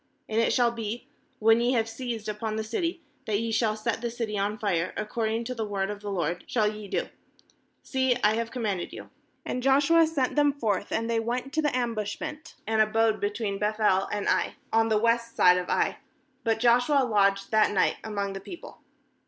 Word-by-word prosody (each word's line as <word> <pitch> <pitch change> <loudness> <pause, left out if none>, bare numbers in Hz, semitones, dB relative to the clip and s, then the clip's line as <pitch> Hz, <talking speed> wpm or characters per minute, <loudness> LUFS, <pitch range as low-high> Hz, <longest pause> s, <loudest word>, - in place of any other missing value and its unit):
8And 220 - -3
it 230 - +3
shall 240 -1 +3
be, 230 0 -5 0.3
when 225 +1 +4
ye 245 +2 +2
have 225 -2 +1
seized 225 -1 -5
upon 215 +1 -3
the 220 - -2
city, 330 +10 -3 0.2
that 205 -2 +1
ye 230 0 -2
shall 220 -1 +1
set 220 +1 -2
the 240 - -2
city 230 -2 -4
on 205 +1 -1
fire; 185 -5 -1
according 225 +1 -1
to 255 +2 -4
the 230 -3 -3
word 200 -1 -2
of 205 - -6
the 205 0 -6
LORD 180 -2 -2
shall 220 -3 +1
ye 210 -1 -5
do; - - -2 0.8
see, 260 -2 +1
I 210 - +5
have 230 +1 -2
commanded 210 -8 -3
you.7 - - -9 0.5
9And - - -3
Joshua 285 +5 +4
sent 280 -5 -1
them 290 -1 +4
forth; 210 -8 -1
and 225 +1 -1
they 230 -1 +1
went 245 +4 -3
to 315 - +1
the 295 -4 0
ambushment, 235 +5 -4
and 220 0 +2
abode 220 0 +2
between 205 -1 -2
Beth 215 +1 -1
el 195 -3 +3
and 205 -1 -2
Ai, - - +1 0.2
on 225 0 +3
the 215 - +3
west 230 +1 +1
side 180 0 +6
of 180 - -5
Ai; - - +1 0.4
but 225 -1 +1
Joshua 245 +4 +4
lodged 200 -4 +2
that 215 -1 +4
night 195 - +2
among 200 -2 -3
the 195 - -5
people. 340 - -10
225 Hz, 205 wpm, -27 LUFS, 210-240 Hz, 0.8 s, side